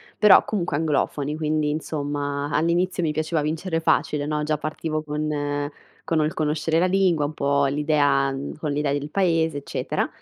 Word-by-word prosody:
però 210 -2 +6
comunque 175 -8 -1
anglofoni. 150 -1 -1
Quindi 155 -1 0
insomma, 145 -2 -3
all'inizio 175 +3 +1
mi 155 -2 +1
piaceva 155 0 -1
vincere 165 +3 -2
facile, 150 -2 +1
no? 150 0 -1
Già 155 0 0
partivo 155 0 -3
con 145 -1 -2 0.3
con 165 -1 0
ol 155 +1 +1
conoscere 155 +1 0
la 180 - +3
lingua, 180 -5 +2
un 150 - -4
po' 140 -1 +1
l'idea 145 -1 +2 0.3
con 150 -2 -2
l'idea 145 -1 0
del 145 +1 -2
paese, 165 -4 +1
eccetera. 140 - -2
150 Hz, 160 wpm, -24 LUFS, 145-160 Hz, 0.3 s, però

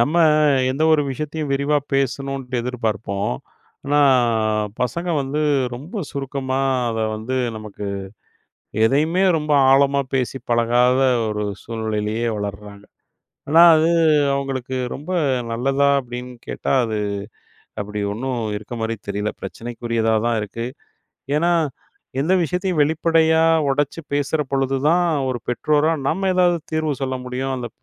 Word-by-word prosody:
நம்ம 145 +8 +2 0.5
எந்த 140 +4 -2
ஒரு 155 -2 +4
விஷயத்தையும் 150 +1 -4
விரிவா 140 +2 +2 0.2
பேசணுன்ட்டு 135 -2 -1
எதிர்பார்ப்போம். 110 - -2 0.5
ஆனா 145 +1 +3 0.8
பசங்க 170 +8 -1
வந்து 140 +3 -2 0.3
ரொம்ப 170 - -6
சுருக்கமா. 135 -1 -3 0.3
அத 115 - -3 0.2
வந்து 120 +4 -3 0.2
நமக்கு 105 -1 -7 1.0
எதையுமே 155 +9 +2
ரொம்ப 150 -1 -1 0.2
ஆழமா 140 +1 +4
பேசி 130 0 -1
பழகாத 120 +2 +3 0.3
ஒரு 105 0 -2 0.2
சூழ்நிலையிலேயே 110 0 -2
வளர்றாங்க. 100 0 -6 0.7
ஆனா, 165 +3 +6
அது 160 +1 +3 0.4
அவங்களுக்கு 130 -2 -3 0.2
ரொம்ப 150 +6 -7 0.4
நல்லதா 135 +4 +1
அப்டின்னு 125 0 -7
கேட்டா, - - -3
அது 110 -2 -2 0.8
அப்டி 105 +1 -4
ஒண்ணும் 125 +3 -3 0.2
இருக்க 110 +3 -7
மாரி 115 0 -1
தெரில 105 +1 -2
பிரச்சனைக்குரியதா 115 -1 -2
தான் 120 -1 +1
இருக்கு. 115 +3 -5 0.7
ஏன்னா, 170 +3 +2 0.7
எந்த 175 +6 +2
விஷயத்தையும் 180 -1 0
வெளிப்படையா 160 +1 +3 0.3
உடைச்சு 145 +4 -1
பேசுற 145 +2 0
பொழுது 135 0 +1
தான் 175 +2 +3 0.2
ஒரு 125 -2 -2
பெற்றோரா 150 +5 +2
நம்ம 190 +3 0
ஏதாவது 175 -2 +3
தீர்வு 155 -1 0
சொல்ல 130 -1 -1
முடியும் 130 +1 -3
அந்த 125 -2 -4
135 Hz, 120 wpm, -21 LUFS, 115-150 Hz, 1.0 s, ஆனா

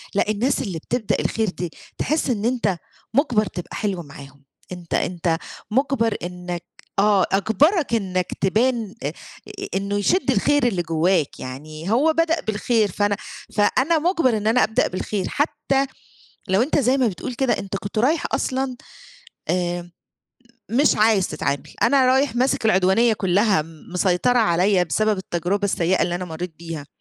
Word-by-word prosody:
لأ 205 - +1
الناس 240 +6 +1
اللي 175 -6 -4
بتبدأ 235 +4 -1
الخير 220 -2 0
دي، 175 -1 -5 0.3
تحس 310 -2 0
إن 220 -2 -1
أنت 235 -7 0 0.4
مُجبَر 240 -5 +2
تبقى 175 -1 -7
حلو 195 -5 -2
معاهم 140 -1 -13 0.3
أنت، 175 -2 -7
أنت 170 -2 0 0.3
مُجبَر 255 -2 +1
إنّك 180 -1 -5 0.4
آه، 200 -2 +4
أجبَرَك 280 - +2
إنّك 185 -5 -1
تبان 220 +1 +1
أ - - 0 0.5
أ 390 - -4
إنه 200 +1 -1
يشِدّ 280 - +2
الخير 290 -4 +2
اللي 190 -6 0
جوّاك، 165 -1 0
يعني 155 +7 -6
هو 290 +8 +3
بدأ 330 +1 +1
بالخير 215 0 0
فأنا، 205 +2 0 0.4
فأنا 260 +10 +3
مُجبَر 315 - +2
إن 210 - -2
أنا 240 +3 +4
أبدأ 220 +3 +2
بالخير، 185 +1 -3
حتى 275 -2 0 0.6
لو 190 +3 +3
أنت 290 +4 +2
زي 260 +1 +2
ما 255 -3 +3
بتقول 215 +4 -4
كده 260 +1 +1
أنت 195 0 -5
كنت 200 +2 -4
رايح 290 +8 +2
أصلًا 260 0 -1 0.7
آمم، 175 -1 -1 0.8
مش 275 +6 +3
عايز 215 -3 +3
تتعامل، 140 +1 -3
أنا 270 -2 +4
رايح 260 -1 +2
ماسِك 255 -1 +1
العدوانية 215 +3 +4
كلّها 195 -3 +2
م 160 -1 -15
مسيطرة 185 +7 +2
عليَّ 185 -2 +3
بسبب 215 +5 +1
التجربة 185 +2 -2
السيئة 185 -2 +1
اللي 175 - 0
أنا 180 +1 -3
مرّيت 165 0 -6
بيها، 165 -4 -7
205 Hz, 155 wpm, -22 LUFS, 180-250 Hz, 0.8 s, آه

